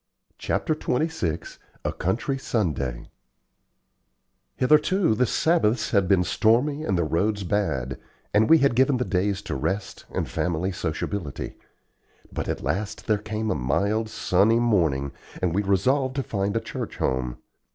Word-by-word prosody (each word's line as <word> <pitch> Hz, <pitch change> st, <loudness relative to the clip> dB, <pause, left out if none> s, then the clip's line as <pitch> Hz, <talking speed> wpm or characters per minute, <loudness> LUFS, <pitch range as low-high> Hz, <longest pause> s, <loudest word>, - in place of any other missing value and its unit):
CHAPTER -, -, 0 dB
XXVI 150 Hz, -, -2 dB, 0.3 s
A -, -, 0 dB
COUNTRY 125 Hz, -, -1 dB
SUNDAY 70 Hz, -, -2 dB, 1.4 s
Hitherto 155 Hz, -, +3 dB
the 125 Hz, +3 st, +2 dB
Sabbaths 125 Hz, -9 st, +2 dB
had 100 Hz, -2 st, +3 dB
been 90 Hz, -1 st, +4 dB
stormy 125 Hz, +10 st, +2 dB
and 95 Hz, -, 0 dB
the 85 Hz, -, +2 dB
roads 100 Hz, +7 st, 0 dB
bad, 80 Hz, -10 st, -1 dB, 0.3 s
and 105 Hz, +1 st, +4 dB
we 165 Hz, -, +8 dB
had 140 Hz, -4 st, +3 dB
given 130 Hz, +2 st, +3 dB
the 125 Hz, -, -1 dB
days 100 Hz, +1 st, 0 dB
to -, -, -4 dB
rest 95 Hz, +9 st, -3 dB
and -, -, -2 dB
family 90 Hz, +2 st, -1 dB
sociability. 85 Hz, -2 st, -4 dB, 0.8 s
But -, -, -3 dB
at -, -, -3 dB
last 100 Hz, +1 st, -2 dB
there 110 Hz, -2 st, +2 dB
came 110 Hz, +1 st, -3 dB
a -, -, +3 dB
mild, 100 Hz, -, 0 dB
sunny 105 Hz, +4 st, +3 dB
morning, 80 Hz, -, +1 dB, 0.3 s
and 90 Hz, -3 st, 0 dB
we 100 Hz, -, +2 dB
resolved 130 Hz, +8 st, +1 dB
to 135 Hz, -, 0 dB
find 100 Hz, -1 st, -1 dB
a -, -, -1 dB
church 115 Hz, -, -6 dB
home. 65 Hz, -2 st, -1 dB
100 Hz, 145 wpm, -25 LUFS, 90-120 Hz, 1.4 s, we